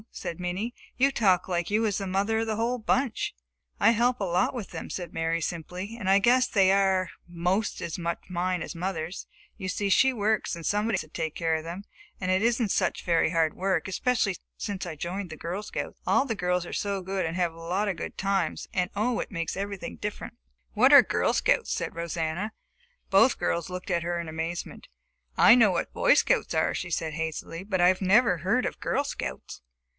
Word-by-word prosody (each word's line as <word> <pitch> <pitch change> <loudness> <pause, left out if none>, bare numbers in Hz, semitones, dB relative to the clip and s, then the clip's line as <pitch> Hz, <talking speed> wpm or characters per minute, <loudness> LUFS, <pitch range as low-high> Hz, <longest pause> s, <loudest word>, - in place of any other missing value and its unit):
said 170 - -6
Minnie. 185 +7 -3 0.2
"You 275 +2 +4
talk 190 -8 +2
like 175 -2 -1
you 215 +2 +2
was 210 -3 0
the 195 - -4
mother 200 +4 +1
of 225 - -1
the 220 - -1
whole 235 +3 0
bunch!" 245 - 0 0.4
"I - - +6
help 240 +2 +2
a - - -1
lot 180 -1 +1
with 220 -7 -6
them," - - -6
said 175 -2 -5
Mary 165 +1 -1
simply, 180 +6 -5
"and 195 -5 -2
I 195 - +6
guess 250 +5 +4
they 190 -2 +4
are 190 -1 +2 0.2
'most 180 +4 -1
as 170 - -4
much 170 0 -2
mine 180 0 -1
as - - -6
mother's. 175 0 -4 0.3
You 185 - -4
see 200 +1 -1
she 265 +7 +5
works 215 -5 0
and 170 -1 -8
somebody 210 +1 +1
has - - -1
to - - -11
take 160 0 -4
care 165 -1 0
of 160 0 -1
them. 170 +4 -6 0.4
And 185 -1 -1
it 185 +1 +2
isn't 230 -2 +1
such - - 0
very 165 -2 +3
hard 160 -2 +1
work, 190 -3 -1
especially 200 0 0 0.2
since 200 -3 -4
I 165 - -5
joined 180 +5 -4
the 160 - -8
Girl 175 +6 -4
Scouts. 210 - -6
All 275 - +3
the 230 -5 -2
girls 180 -2 0
are - - -8
so 200 -2 -2
good, 190 +1 -2
and 165 +1 -3
have 175 -2 +1
such 165 - -16
a - - -11
lot 185 +5 -1
of 195 - -1
good 165 - -6
times, 195 -4 -1
and 180 -1 0
oh, 225 +4 0
it - - -4
makes 170 -4 -3
everything 195 - -5
different!" - - -5 0.4
"What - - +5
are - - +10
Girl - - +1
Scouts?" - - +1
said - - -3
Rosanna. 170 +4 -3 0.6
Both 225 +6 +5
girls 170 +1 -1
looked 180 +1 -5
at 170 -1 +1
her 175 0 -2
in 170 - -5
amazement. 160 +2 -5 0.5
"I - - +8
know 235 -4 +6
what 185 - -2
Boy - - +4
Scouts - - +2
are," - - +2
she 175 - -4
said 160 -2 -2
hastily, 160 +2 -4
"but 195 -2 -2
I 180 +1 +5
never 195 -1 +4
heard 195 +10 +1
of - - -4
Girl - - 0
Scouts." - - -6
185 Hz, 215 wpm, -27 LUFS, 170-210 Hz, 0.6 s, are